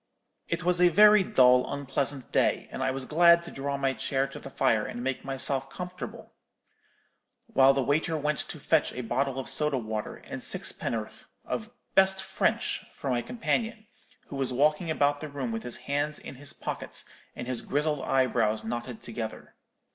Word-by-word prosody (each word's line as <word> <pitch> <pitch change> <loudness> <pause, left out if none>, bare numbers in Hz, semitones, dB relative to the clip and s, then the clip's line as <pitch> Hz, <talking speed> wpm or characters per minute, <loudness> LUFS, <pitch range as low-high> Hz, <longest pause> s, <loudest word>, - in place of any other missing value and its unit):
"It - - -2
was 180 0 +3
a 180 - +7
very 210 +3 +7
dull 125 -7 +4
unpleasant 140 -1 -2
day, - - +2
and - - -5
I - - +1
was 130 0 -3
glad 170 +3 +6
to 170 - -9
draw 140 +1 -3
my 135 -1 +1
chair 135 +3 0
to - - -9
the - - -9
fire 110 -5 +2
and 120 +3 -5
make 135 0 -2
myself 135 0 -1
comfortable, 180 +5 -7 1.1
while 135 0 +5
the 135 - +1
waiter 155 +4 +1
went 150 0 -1
to 155 - -6
fetch 160 +2 +2
a 125 - -4
bottle 130 +3 -1
of 135 - -4
soda 150 -2 +1
water 110 -3 -4
and - - -8
sixpenn'orth 110 -2 -2 0.2
of 220 0 -4 0.2
'best 190 0 +4
French' - - 0
for 135 - -4
my 120 -1 +1
companion, 225 - -2 0.4
who 140 - -6
was 135 -2 -1
walking 150 +6 +2
about 145 -2 +2
the 155 - -5
room 135 -4 -4
with 115 0 -3
his 120 0 -4
hands 145 +1 -1
in - - -9
his 140 +2 -4
pockets, - - -4 0.3
and - - -5
his 125 -1 -2
grizzled 150 0 0
eyebrows 125 -5 +1
knotted 120 +1 -5
together. 115 -1 -6
135 Hz, 180 wpm, -28 LUFS, 125-155 Hz, 1.1 s, a